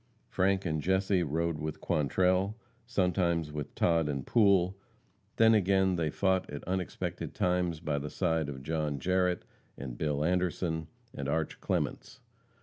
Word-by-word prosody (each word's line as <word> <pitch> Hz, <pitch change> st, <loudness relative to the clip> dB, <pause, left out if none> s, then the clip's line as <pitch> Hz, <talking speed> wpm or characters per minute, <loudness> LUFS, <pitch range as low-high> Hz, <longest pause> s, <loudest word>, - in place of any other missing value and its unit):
Frank 95 Hz, +1 st, +1 dB
and 80 Hz, -2 st, -1 dB
Jesse 95 Hz, +2 st, +2 dB
rode 85 Hz, 0 st, -1 dB
with 75 Hz, 0 st, -4 dB
Quantrell, 90 Hz, -, +1 dB, 0.3 s
sometimes 90 Hz, -7 st, +1 dB
with 75 Hz, -1 st, -6 dB
Todd 80 Hz, -3 st, +2 dB
and 70 Hz, -3 st, -3 dB
Poole, 100 Hz, -5 st, +4 dB, 0.6 s
then 115 Hz, 0 st, +6 dB
again 95 Hz, -2 st, +3 dB
they 80 Hz, -3 st, 0 dB
fought 95 Hz, +3 st, +1 dB
at 70 Hz, -1 st, -6 dB
unexpected 90 Hz, -2 st, -3 dB
times 90 Hz, -3 st, 0 dB
by 75 Hz, -3 st, -1 dB
the 75 Hz, +1 st, -5 dB
side 80 Hz, -2 st, 0 dB
of 65 Hz, -2 st, -7 dB
John 75 Hz, -1 st, -1 dB
Jarrette, 90 Hz, +2 st, +1 dB, 0.3 s
and 65 Hz, -3 st, -7 dB
Bill 75 Hz, -1 st, 0 dB
Anderson, 85 Hz, -2 st, 0 dB, 0.3 s
and 70 Hz, 0 st, -4 dB
Arch 80 Hz, +1 st, -1 dB
Clements. 125 Hz, -, -2 dB
85 Hz, 145 wpm, -30 LUFS, 75-95 Hz, 0.6 s, then